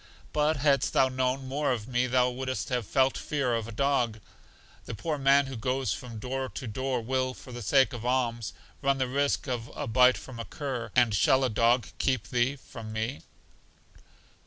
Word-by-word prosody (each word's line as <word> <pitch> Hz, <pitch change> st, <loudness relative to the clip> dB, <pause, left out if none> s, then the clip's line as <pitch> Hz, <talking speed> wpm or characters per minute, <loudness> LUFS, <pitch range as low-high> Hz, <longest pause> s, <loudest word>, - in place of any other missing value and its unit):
But 150 Hz, +1 st, +2 dB
hadst 140 Hz, -1 st, +2 dB
thou 130 Hz, -, +4 dB
known 130 Hz, +1 st, -1 dB
more 140 Hz, +2 st, 0 dB
of 115 Hz, -3 st, -2 dB
me 125 Hz, 0 st, +1 dB
thou 125 Hz, 0 st, +3 dB
wouldst 130 Hz, -5 st, -4 dB
not -, -, +2 dB
have 120 Hz, -5 st, -3 dB
felt 130 Hz, +3 st, +2 dB
fear 140 Hz, -5 st, -1 dB
of 115 Hz, -1 st, -1 dB
a -, -, -7 dB
dog. 120 Hz, -3 st, +1 dB, 0.7 s
The -, -, -5 dB
poor 150 Hz, +7 st, -3 dB
man 140 Hz, +1 st, +5 dB
who 135 Hz, -1 st, -6 dB
goes 125 Hz, -1 st, -1 dB
from 115 Hz, +3 st, -7 dB
door 130 Hz, +3 st, -3 dB
to 130 Hz, -, -7 dB
door 125 Hz, +3 st, -2 dB
will, 130 Hz, +1 st, -1 dB
for 125 Hz, -, -12 dB
the 120 Hz, 0 st, -7 dB
sake 130 Hz, +2 st, +3 dB
of 120 Hz, -2 st, -6 dB
alms, 120 Hz, -4 st, 0 dB, 0.3 s
run 140 Hz, -1 st, +2 dB
the 130 Hz, -1 st, 0 dB
risk 140 Hz, +2 st, 0 dB
of 120 Hz, -2 st, -3 dB
a 145 Hz, -, -3 dB
bite 125 Hz, 0 st, +5 dB
from 115 Hz, +4 st, -9 dB
a 115 Hz, -, -4 dB
cur; 130 Hz, -5 st, -4 dB
and 120 Hz, -4 st, +4 dB
shall 130 Hz, +7 st, +4 dB
a 130 Hz, -, +2 dB
dog 115 Hz, +1 st, +2 dB
keep 130 Hz, -4 st, 0 dB
thee 125 Hz, +3 st, +1 dB
from 115 Hz, -5 st, -10 dB
me? 110 Hz, +5 st, -3 dB
125 Hz, 200 wpm, -28 LUFS, 115-135 Hz, 0.7 s, man